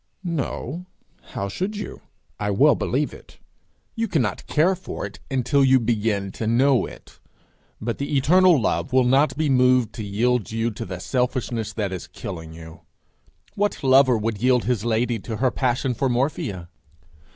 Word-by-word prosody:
No; 170 0 -4 0.5
how 100 - -2
should 190 - -3
you? 210 - -7 0.4
I - - -1
well - - +5
believe - - -1
it! - - -15 0.6
You 230 -1 -1
cannot 125 - -1
care 165 +5 +3
for 185 - -6
it - - -9
until 135 +1 +2
you 130 -1 +5
begin 105 -4 -1
to 110 - -4
know 130 +3 +3
it. - - -14 0.6
But 115 +1 -3
the 140 +1 -1
eternal 175 +3 +5
love 125 - -1
will 130 0 +4
not 135 +4 +3
be 155 0 +1
moved 125 -3 +3
to 110 - -6
yield 110 +3 0
you 115 +1 -1
to 115 +2 -6
the 90 -4 -6
selfishness 125 -1 -2
that 105 -4 -2
is 90 - -6
killing 80 -4 -8
you. 80 0 -12 0.7
What 205 -5 -1
lover 130 -2 +5
would 110 -1 -3
yield 125 -1 +3
his 120 -4 -1
lady 115 0 0
to 110 +2 -6
her 130 +2 +2
passion 130 +1 0
for 135 +3 0
morphia? 120 - -2
125 Hz, 165 wpm, -23 LUFS, 110-140 Hz, 0.7 s, well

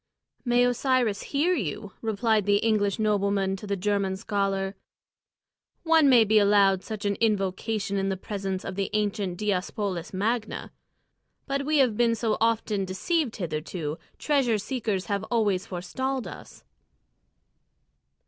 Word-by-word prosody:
"May 245 0 +3
Osiris 245 -4 +1
hear 310 +6 +1
you!" 205 - -3
replied 220 -1 +1
the 205 - +4
English 205 -2 +1
nobleman 200 -2 +1
to 205 - -9
the 200 - 0
German 195 -1 0
scholar. 195 -1 -1 1.1
"One 320 -3 +5
may 245 -3 +7
be 215 0 +4
allowed 200 -2 +4
such 215 -1 -6
an 200 - +2
invocation 200 -1 0
in 195 0 0
the 190 - -2
presence 195 -1 -4
of 195 - -4
the 195 0 -2
ancient 205 -3 -1
Diospolis 195 -2 -2
Magna. 220 +4 -2 0.7
But 275 0 -2
we 310 0 +2
have 250 -6 +3
been 235 -1 +3
so 220 -1 0
often 220 -3 +1
deceived 235 - -1
hitherto; 160 -2 -4 0.2
treasure 270 -7 +2
seekers 210 -3 -2
have 200 -2 -2
always 205 -6 0
forestalled 255 +9 -3
us." - - -11
210 Hz, 135 wpm, -26 LUFS, 195-230 Hz, 1.1 s, may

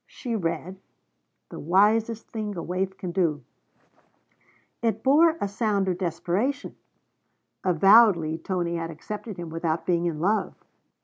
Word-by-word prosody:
She 240 -3 -5
read: 185 0 -3 0.7
'The - - -7
wisest 215 +7 +2
thing 210 -3 -4
a 170 - -4
waif 190 +2 -3
can 180 - -5
do.' 165 -6 0 1.4
It 225 -2 -1
bore 315 +5 +5
a - - -1
sound 200 -1 0
of 180 -1 -1
desperation. 185 - -2 0.9
Avowedly 185 -3 +5
Tony 175 -2 -2
had 165 0 -4
accepted 205 +6 -7
him 170 -2 -7
without 165 0 -2
being 175 -1 +1
in 160 -3 -3
love. 205 +6 0
190 Hz, 130 wpm, -25 LUFS, 170-215 Hz, 1.4 s, bore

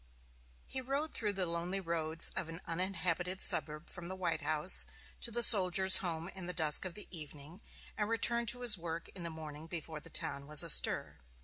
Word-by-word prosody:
He 260 - -4
rode 275 +5 -4
through 210 -3 -2
the 190 -2 -2
lonely 170 +3 -4
roads 165 -2 -1
of 165 - -4
an 165 +1 -8
uninhabited 180 +1 -3
suburb 150 +1 +3
from 175 -2 -8
the 190 - -7
White 170 -4 -3
House 155 +3 0 0.3
to - - -3
the 235 +1 +4
Soldiers' 190 -3 +8
Home 165 -3 -4
in 190 -2 -9
the 180 - -6
dusk 155 0 +1
of 185 - -7
the 210 - -8
evening, 155 +3 -11 0.3
and 210 0 -3
returned 235 +1 0
to 245 +2 -1
his 220 -6 +4
work 165 0 -7
in 185 - -9
the 170 - -5
morning 155 -1 -10
before 160 -2 -7
the - - -16
town 140 0 -4
was 150 -1 +4
astir. - - +2
175 Hz, 195 wpm, -32 LUFS, 160-195 Hz, 0.3 s, Soldiers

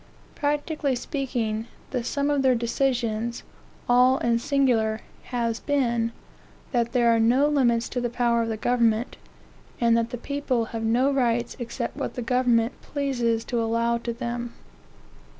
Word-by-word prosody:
Practically 290 -1 -1
speaking, 240 -4 -2 0.2
the 250 -3 -1
sum 280 +4 0
of 285 -1 +2
their 260 -2 +4
decisions, 235 -1 -1 0.4
all 250 +2 +5
and 235 -2 +1
singular, 240 -6 +1 0.2
has 235 -2 -2
been, 235 -5 0 0.6
that 235 -2 +1
there 240 -2 +4
are - - +2
no 245 +5 +4
limits 240 -6 +2
to 250 - -2
the 240 - -1
power 235 -1 +1
of 230 - -1
the 220 - -2
government, 235 0 +1 0.6
and 235 -1 +4
that 230 0 +1
the 245 - -5
people 260 -2 -1
have 225 - -3
no 240 +5 +2
rights 240 -3 0
except 235 0 -4
what - - -4
the 245 - -3
government 245 -1 +1
pleases 240 -6 -1
to 240 -1 -1
allow 230 +1 +1
to 235 0 -4
them. 240 0 -4
240 Hz, 150 wpm, -25 LUFS, 230-260 Hz, 0.6 s, all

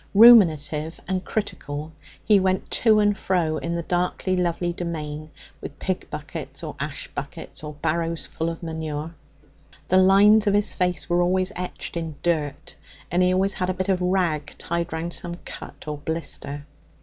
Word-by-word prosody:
Ruminative 165 -9 +6
and 185 0 -1
critical, 155 -8 -4 0.3
he 210 -2 +6
went 185 0 0
to 220 -2 +4
and 205 -1 +3
fro 170 -6 0
in 170 +1 -3
the 170 - -2
darkly 180 +2 0
lovely 175 -1 0
domain, 155 -3 -5 0.3
with - - -8
pig - - -3
buckets - - -7
or - - -5
ash - - -4
buckets - - -7
or 150 0 -6
barrows 165 +1 0
full 165 +1 -3
of 165 +1 -7
manure. 160 -1 -4 0.8
The 185 - +5
lines 205 +3 +6
of 200 - +4
his 205 0 +1
face 180 -1 0
were 175 0 +2
always 185 +2 +2
etched 180 -1 -5
in 165 -2 -4
dirt, 155 -4 -1 0.4
and 175 +2 +2
he 180 0 +4
always 190 +2 +2
had 180 -1 -2
a 185 - 0
bit 185 +1 -2
of 185 -1 +2
rag 175 -5 0
tied 170 0 -2
round 165 +1 -3
some 170 -1 -3
cut - - -9
or 150 -1 -4
blister. 145 -2 -4
175 Hz, 170 wpm, -24 LUFS, 160-185 Hz, 0.8 s, Ruminative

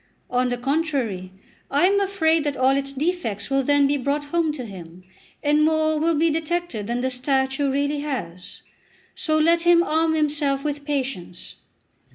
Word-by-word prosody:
On 250 0 +1
the 245 - -2
contrary, 260 - -2 0.4
I 285 +5 +3
am 400 +2 +3
afraid 330 -6 +1
that 290 -1 -2
all 260 +1 +3
its 275 0 -2
defects 275 - -2
will 270 0 +3
then 285 +1 +3
be 285 +1 +1
brought 285 +2 -1
home 325 +1 0
to 260 -5 -6
him, 180 -3 -11 0.4
and 295 +1 +3
more 315 0 +2
will 330 +1 +2
be 320 +2 +2
detected 325 -8 -2
than 240 +1 -2
the 260 +1 -1
statue 265 +2 0
really 285 +2 0
has. 210 - -6 0.5
So 310 -3 -1
let 335 +2 +3
him 345 0 +5
arm 320 0 +1
himself 290 -3 0
with 290 -1 -3
patience." 260 - -4
285 Hz, 170 wpm, -23 LUFS, 260-315 Hz, 0.5 s, him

